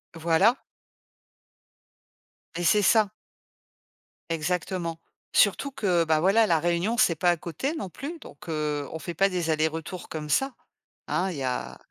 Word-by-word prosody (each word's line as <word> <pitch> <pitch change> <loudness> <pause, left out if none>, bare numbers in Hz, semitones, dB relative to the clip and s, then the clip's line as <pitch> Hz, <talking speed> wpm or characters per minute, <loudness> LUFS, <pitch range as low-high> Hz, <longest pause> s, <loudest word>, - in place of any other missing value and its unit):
Voilà. 170 +9 +3 2.0
Eh 175 - -2
c'est 210 +5 +4
ça. 210 +1 +4 1.2
Exactement. 165 +1 -2 0.3
Surtout 220 +7 +3
que, 180 -9 +1
bah 160 -1 +2
voilà, 200 +7 +4
La 165 -2 +3
Réunion, 175 +8 0
c'est 175 -6 +4
pas 175 +3 +2
à 175 - 0
côté 175 - -3
non 290 - -5
plus 300 - -7
donc 165 - -12
heu, 150 -2 -2
on 160 - -5
fait 175 - -5
pas 195 +3 +3
des 175 -3 -2
allers-retours 160 +3 -2
comme 155 -1 -5
ça, 270 - +1 0.5
hein, 190 +2 0
il 165 - -6
y 135 - -3
a 125 -1 -3
175 Hz, 150 wpm, -26 LUFS, 160-200 Hz, 2.0 s, c'est